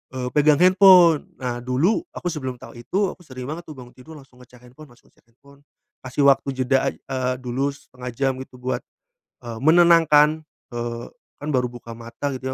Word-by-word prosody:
eee, 125 -1 -3
pegang 150 0 +4
handphone. 185 -4 +6
Nah 125 -2 -4
dulu 145 - +1
aku - - -6
sebelum 130 -5 -5
tahu - - -13
itu 190 - -1
aku 180 - -16
sering 130 -5 -9
banget 165 +4 -7
tuh 155 - -9
bangun 125 -2 -13
tidur 145 +5 -13
langsung 130 -2 -20
ngecek 125 0 -20
handphone 150 +5 -15
langsung 120 - -23
ngecek - - -33
handphone. 140 +4 -22 0.4
Kasih 135 +2 +1
waktu 140 0 +3
jeda 135 +1 +2
aj - - -16
eee, 130 -1 -3
dulu 130 +3 -2
setengah 125 -3 -10
jam 135 +3 -1
gitu 125 -1 -17
buat, 125 -1 -3 0.6
eee, 115 -1 -6
menenangkan, 160 -2 +5 0.3
eee, 120 0 -4 0.3
kan 145 - -7
baru 125 -3 +1
buka 120 -1 -10
mata 115 +5 -6
gitu 130 - -9
135 Hz, 185 wpm, -22 LUFS, 125-155 Hz, 0.6 s, handphone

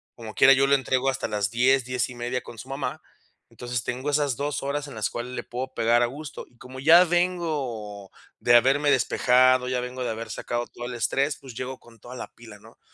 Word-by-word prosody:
Como 110 -2 -9
quiera, 135 - +7
yo 135 0 +4
lo 140 - +5
entrego 130 -1 0
hasta 130 - -3
las 105 -3 -1
10, 125 +3 +2
10 125 0 -1
y 125 - -10
media 120 +1 -3
con 115 - -11
su 110 - -10
mamá. 135 +1 -4 0.5
Entonces, 120 -1 -4
tengo 130 +4 -3
esas 145 -3 +1
2 145 +3 -3
horas 145 +1 -3
en 140 - -10
las 110 -1 -1
cuales 120 +1 -5
le - - -4
puedo 130 +2 -6
pegar 115 +1 +3
a 120 - +3
gusto. 145 +4 -8
Y 120 - -28
como 130 +2 -10
ya 165 +6 +7
vengo 150 - -2 0.3
de 120 - +4
haberme 135 +5 +4
despejado, 130 +1 +3
ya 130 -1 0
vengo 125 +1 -5
de - - -2
haber 115 +1 -5
sacado 120 0 -3
todo 120 - -9
el 125 - -6
estrés, 135 +5 0
pues, 130 -3 -11
llego 130 +2 -5
con 115 -1 -19
toda 120 +4 -11
la - - -6
pila, 110 -3 -13
¿no? 110 +2 -18
125 Hz, 225 wpm, -25 LUFS, 120-135 Hz, 0.5 s, quiera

